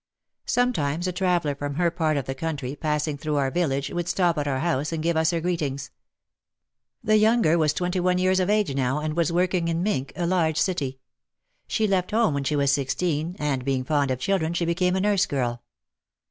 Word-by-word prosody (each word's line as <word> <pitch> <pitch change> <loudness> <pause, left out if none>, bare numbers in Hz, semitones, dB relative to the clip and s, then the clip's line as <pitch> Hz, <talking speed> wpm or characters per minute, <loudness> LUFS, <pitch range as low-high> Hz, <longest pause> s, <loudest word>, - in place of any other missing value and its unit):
Sometimes 175 - 0
a - - 0
traveller 175 -5 0
from 145 0 -5
her 170 +1 +2
part 160 -3 0
of 135 - -2
the 135 - -3
country, 140 -2 -4
passing 150 -1 -2
through 150 0 -2
our 135 -2 +1
village, 140 -5 -1
would 175 -1 -3
stop 175 -3 +2
at 145 - -2
our 135 -2 0
house 155 -3 0
and 160 -1 -3
give 170 0 +1
us 160 0 +2
her 170 - 0
greetings. 150 -6 -2 1.1
The 215 0 +4
younger 215 -6 +4
was 155 -3 +3
twenty 180 +3 -1
one 180 0 +2
years 185 +1 +2
of 185 +1 0
age 210 -8 +2
now 135 0 0
and 155 0 -3
was 170 0 +1
working 180 0 +1
in 165 +1 -1
Mintck, 140 -10 -1
a 175 - -1
large 170 -3 +1
city. 145 -9 -1 0.7
She 220 - 0
left 185 -2 0
home 220 -5 +2
when 140 0 -1
she 150 - 0
was 140 -1 +2
sixteen 150 +4 -1
and 140 -4 -1
being 130 -1 0
fond 145 0 +1
of 130 - 0
children 170 +3 0
she 170 - 0
became 180 +2 +1
a 190 - 0
nurse 200 -1 +2
girl. 120 -4 -2
160 Hz, 210 wpm, -25 LUFS, 140-180 Hz, 1.1 s, The